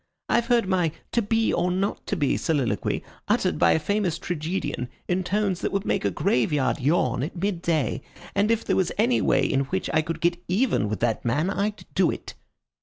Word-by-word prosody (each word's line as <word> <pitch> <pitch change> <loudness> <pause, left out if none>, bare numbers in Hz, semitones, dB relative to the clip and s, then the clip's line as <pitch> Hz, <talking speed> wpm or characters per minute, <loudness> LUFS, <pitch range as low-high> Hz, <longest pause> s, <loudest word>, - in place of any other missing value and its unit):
I've 235 - +2
heard 235 -4 +3
my 180 -4 +2 0.2
'To 235 - +2
be 225 +1 +1
or 180 - +1
not 190 +3 -2
to - - 0
be' 145 -5 +1
soliloquy 130 - 0 0.2
uttered - - +1
by - - +5
a - - +2
famous 190 -1 0
tragedian 165 -7 -3 0.2
in 185 +1 0
tones 195 -1 0
that - - -1
would 195 -1 -1
make - - 0
a 100 - +2
graveyard 125 - +1
yawn 130 -3 +1
at 150 +8 -4
mid 185 -1 -2
day, 160 -8 0 0.3
and 205 +2 +2
if 230 0 +1
there - - +1
was 185 -2 +1
any 235 +4 +3
way - - +3
in 135 +1 +1
which 190 +7 -2
I 155 - +4
could 165 +1 -4
get 175 +1 +1
even 190 - +1
with 105 -3 -3
that 115 -2 0
man 150 +10 +1
I'd 205 +1 -2
do 185 -2 +3
it." - - -5
175 Hz, 205 wpm, -25 LUFS, 145-200 Hz, 0.3 s, by